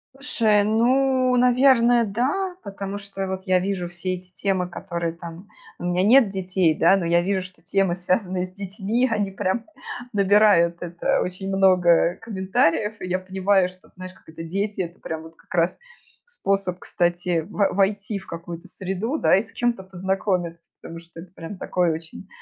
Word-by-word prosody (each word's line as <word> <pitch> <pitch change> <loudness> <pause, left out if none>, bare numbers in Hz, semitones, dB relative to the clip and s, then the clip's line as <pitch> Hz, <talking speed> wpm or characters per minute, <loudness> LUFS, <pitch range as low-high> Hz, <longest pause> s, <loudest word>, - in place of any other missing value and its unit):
Слушай, 225 -7 +2
ну, 255 +4 +2
наверное, 245 -1 +5
да, 270 - -1
потому 200 0 -6
что 195 -1 -6
и - - -1
вот 190 0 -4
я 185 -2 +2
вижу 185 -1 -2
все 175 +1 -3
эти 180 0 -12
темы, 190 -2 -1
которые 170 -2 -4
там 170 +3 -10 0.3
у - - -10
меня 180 +1 +1
нет 235 +2 +6
детей, 185 -3 +1
да, 195 +5 +4
но 175 - -2
я 170 +1 +3
вижу, 190 +1 -1
что 185 0 -13
темы, 195 -3 +1
связанные 180 +1 -1
с 185 - -7
детьми, 200 +5 -1
они 210 -3 0
прям 190 +3 -2 0.5
набирают 200 -4 +4
это 175 0 -1
очень 185 +1 -4
много 180 -3 +4
комментариев, 200 -1 0
и - - -6
я 185 +1 0
понимаю, 190 0 +1
что, 185 0 -18
знаешь, 185 0 -9
как - - -25
это, 160 +1 -9
дети- 200 +4 -2
это 170 0 -6
прям 160 -1 -5
вот 160 0 -13
как - - -15
раз 170 0 +1 0.5
способ, 195 - -1
кстати, 175 -1 0
во 205 -1 +1
войти 200 +1 0
в - - -16
какую-то 170 +2 -8
среду, 195 - -3
да, - - +4
и 195 - +3
с 225 - -12
кем-то 240 -4 -1
познакомиться. 185 -2 -3
Потому 165 0 -9
что 170 0 -13
это 175 0 -14
прям 185 +3 -8
такое 180 -2 0
очень 160 +4 -7
190 Hz, 175 wpm, -23 LUFS, 175-205 Hz, 0.5 s, нет